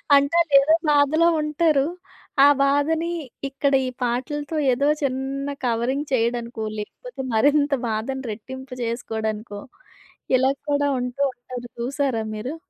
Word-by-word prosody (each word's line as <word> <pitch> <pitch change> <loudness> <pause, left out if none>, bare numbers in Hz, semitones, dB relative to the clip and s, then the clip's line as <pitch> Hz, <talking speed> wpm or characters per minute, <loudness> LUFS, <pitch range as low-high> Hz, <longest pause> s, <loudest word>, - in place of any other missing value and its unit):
అంటే 280 +4 +3
ఆళ్ళేదో 295 -1 +5 0.2
బాధలో 295 +3 +4
ఉంటారు. 300 -2 +2 0.6
ఆ - - +9 0.2
బాధని 310 +4 +1 0.4
ఇక్కడ 275 +1 0
ఈ - - -1
పాటలతో 285 +5 -2 0.2
ఏదో 280 +4 +1 0.2
చిన్న 270 +1 -2 0.2
కవరింగ్ 245 +5 0
చేయడానికో, 235 -1 -1 0.2
లేకపోతే 270 - -8
మరింత 285 +5 +3 0.2
బాధను 235 +5 -3
రెట్టింపు 260 +4 -8
చేసుకోడానికో, 220 -2 -4 0.8
ఇలా 260 +1 +3 0.2
కూడా 285 0 +2
ఉంటూ 250 +2 -4
ఉంటారు 245 0 -8
చూసారా 255 -2 -1
మీరు? 245 +8 -4
270 Hz, 115 wpm, -23 LUFS, 240-285 Hz, 0.8 s, ఆ